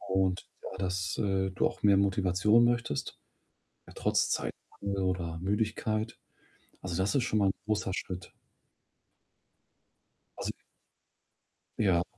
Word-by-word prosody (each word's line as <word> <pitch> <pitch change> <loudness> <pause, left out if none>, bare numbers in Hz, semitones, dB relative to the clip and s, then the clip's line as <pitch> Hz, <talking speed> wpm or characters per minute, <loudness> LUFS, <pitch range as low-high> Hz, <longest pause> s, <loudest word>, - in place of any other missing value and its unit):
Und 95 -2 +1 0.2
ja 95 - -6
dass, 90 -2 -1
äh, 95 -2 +1
du 95 - +2
auch - - -9
mehr 100 -1 +6
Motivation 100 +3 +4
möchtest, 120 -11 -1 0.7
ja - - -12
trotz - - +2
Zeitmangel, 100 -1 -3
oder 90 -3 -1
Müdigkeit. 110 +3 -1 0.6
Also, 90 -2 -3
das 95 +2 +1
ist 135 - +3
schon 110 -3 +1
mal 100 - +4
'n - - +4
großer 105 -3 0
Schritt. 90 -1 -5 2.1
Also - - -2 1.3
Ja. 90 -5 +3
95 Hz, 120 wpm, -30 LUFS, 90-105 Hz, 2.1 s, mehr